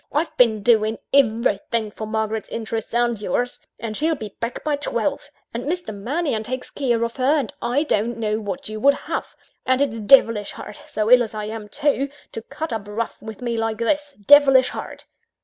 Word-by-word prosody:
I've 310 +3 -1
been 220 -4 +3
doing 220 -1 +3 0.2
everything 230 -4 +2
for 215 +1 -6
Margaret's 220 0 -2
interests 225 -1 -4
and 235 -2 +1
yours 245 +5 -1 0.2
and 220 -1 -4
she'll 320 +5 +1
be 215 -7 -8
back 230 +1 -4
by 300 -1 +1
twelve 285 +1 -2 0.2
and 235 +3 -4
Mr. 350 -5 -3
Mannion 245 +4 -1
takes 250 +3 -5
care 240 -5 0
of 235 +2 -3
her 270 +4 +3
and 285 0 -2
I 245 +5 +1
don't 235 -4 0
know 215 -1 -1
what 225 +7 -5
you 215 0 -5
would 280 +5 +5
have - - -5 0.3
and 260 0 +2
it's 250 -5 0
devilish 220 -2 +5
hard, 210 - -8
so 215 +2 -1
ill 250 0 +8
as 225 -2 -3
I 210 -1 -3
am 215 -1 -6
too, 280 +1 +1 0.2
to 225 - -5
cut 300 +4 -5
up 210 -2 -4
rough 225 +2 -4
with 220 +1 -9
me 235 -1 -1
like 225 -1 -1
this 290 +5 0
devilish 270 -2 +7
hard!" - - -7
230 Hz, 195 wpm, -22 LUFS, 215-275 Hz, 0.3 s, ill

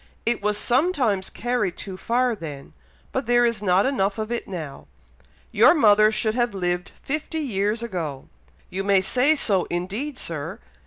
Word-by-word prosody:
"It 235 -2 0
was 210 0 0
sometimes 245 - +1
carried 230 -6 -2
too 190 -2 -7
far 240 +5 0
then, 150 -7 -9 0.4
but 260 -2 -3
there 240 0 +4
is 230 -3 0
not 190 -1 +3
enough 205 -7 0
of 220 +1 -4
it 240 - -3
now. 160 -7 -7 0.6
Your - - +6
mother 215 -5 +5
should 220 0 0
have 240 -3 0
lived 180 -1 -2
fifty 305 +3 -3
years 220 -5 -1
ago." 165 - -5 0.4
"You 190 +2 -3
may 195 -1 +3
say 255 +10 +3
so, 200 - +2
indeed, 205 +11 -3
Sir! 155 - -4
210 Hz, 160 wpm, -23 LUFS, 185-245 Hz, 0.6 s, Your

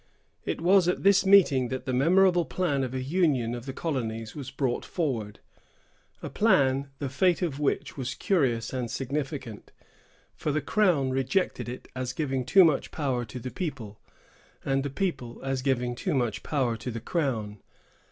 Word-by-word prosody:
It - - -3
was 185 +1 +5
at 180 - 0
this 195 0 +5
meeting 170 -11 +5
that 130 +1 -5
the 130 - -2
memorable 175 +6 +4
plan 145 -7 -1
of 130 0 -4
a 130 - -2
union 140 -6 +1
of 120 +2 -7
the - - -2
colonies 115 -8 -3
was 140 -4 -6
brought 135 -2 -1
forward; 120 - -3 0.8
a - - -4
plan, 140 -10 +2
the 140 - -3
fate 175 +7 +1
of 150 -5 -2
which 145 0 -1
was 130 -1 -3
curious 130 - 0
and 125 -2 -2
significant, 135 -4 -4 0.6
for 150 - -2
the 150 - +1
crown 155 -5 +2
rejected 135 +3 -1
it 125 - -8
as 130 0 -3
giving 135 -5 -2
too 190 +8 +7
much 155 -5 +2
power 130 -5 -2
to 115 +3 -9
the 125 +1 -6
people, 115 - -5 0.7
and 135 0 +1
the 140 - -3
people 135 -7 -3
as 135 -1 -1
giving 125 -2 0
too 155 +6 -2
much 120 -5 -1
power 130 -6 0
to 120 - -6
the 115 -1 -4
crown. 115 - -2
135 Hz, 170 wpm, -27 LUFS, 125-165 Hz, 0.8 s, too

